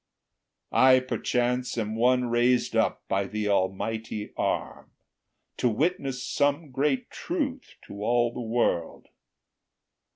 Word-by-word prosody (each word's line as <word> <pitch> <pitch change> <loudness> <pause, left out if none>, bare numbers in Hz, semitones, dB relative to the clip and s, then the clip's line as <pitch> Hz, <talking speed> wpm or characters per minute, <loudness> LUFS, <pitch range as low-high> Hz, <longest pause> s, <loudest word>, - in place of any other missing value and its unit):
I, 130 0 +6
perchance, 125 -1 -1
Am 110 -1 -2
one 125 +2 +3
raised 120 +1 +2
up - - +1
by 100 0 0
the 105 +2 -3
Almighty 105 +3 -2
arm - - -2 0.7
To 125 - +2
witness 135 0 -1
some 145 +3 0
great 150 - 0
truth 285 -7 -4
to 100 - -9
all 120 +1 +2
the - - -5
world. 115 -8 -1
125 Hz, 110 wpm, -27 LUFS, 110-135 Hz, 0.7 s, I